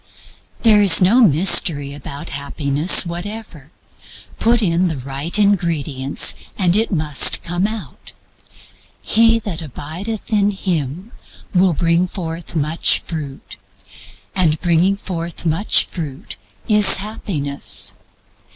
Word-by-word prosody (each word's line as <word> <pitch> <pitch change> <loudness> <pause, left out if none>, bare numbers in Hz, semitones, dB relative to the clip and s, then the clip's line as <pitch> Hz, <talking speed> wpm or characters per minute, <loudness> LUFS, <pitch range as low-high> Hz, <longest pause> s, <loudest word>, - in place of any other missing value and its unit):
There 215 -3 +5
is 190 -5 +7
no 205 +8 +3
mystery 155 - +4
about 140 0 -8
Happiness 140 +4 +2
whatever. 175 -3 -8 0.7
Put 230 0 +1
in 175 0 +1
the 160 -4 -4
right 135 +7 -3
ingredients 165 -9 0 0.2
and 180 -3 +1
it 220 +2 +1
must 150 -6 +2
come 175 +3 -2
out. 155 - -9 0.9
He 225 +1 +3
that 200 -7 -6
abideth 175 - -7
in 205 -1 +2
Him 180 - -4 0.4
will 185 -1 +2
bring 170 +3 0
forth 170 -2 -7
much 155 +2 +2
fruit; 150 -5 -8 0.8
and 160 -5 +1
bringing 175 +3 +1
forth 170 -3 -7
much 165 +6 +2
fruit 150 -7 -8 0.3
is 210 -2 +6
Happiness. 180 -9 -4
170 Hz, 110 wpm, -17 LUFS, 150-200 Hz, 0.9 s, is